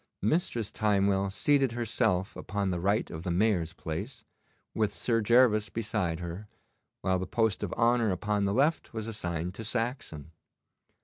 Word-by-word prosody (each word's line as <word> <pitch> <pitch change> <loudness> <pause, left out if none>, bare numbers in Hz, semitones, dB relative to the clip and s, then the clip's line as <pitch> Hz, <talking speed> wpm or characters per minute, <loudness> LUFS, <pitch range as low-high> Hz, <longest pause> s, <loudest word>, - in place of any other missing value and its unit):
Mistress 115 - 0
Timewell 100 -2 +2
seated 135 +3 +2
herself 110 -5 0
upon 100 -1 -2
the 90 - -2
right 100 +5 0
of 80 - -6
the 90 - -4
Mayor's 90 -3 +1
place, 105 - -6 0.5
with 105 -2 +1
Sir 115 +2 0
Gervas 110 -1 +4
beside 100 -7 -2
her, 85 +5 -6 0.5
while 95 0 +1
the 95 - -4
post 110 0 +1
of 100 -4 -3
honour 120 -1 +3
upon 100 +2 0
the 100 - 0
left 145 +2 +1
was 110 -1 -3
assigned 90 -5 -3
to 115 - -7
Saxon. 115 - -4
105 Hz, 150 wpm, -29 LUFS, 90-115 Hz, 0.5 s, Gervas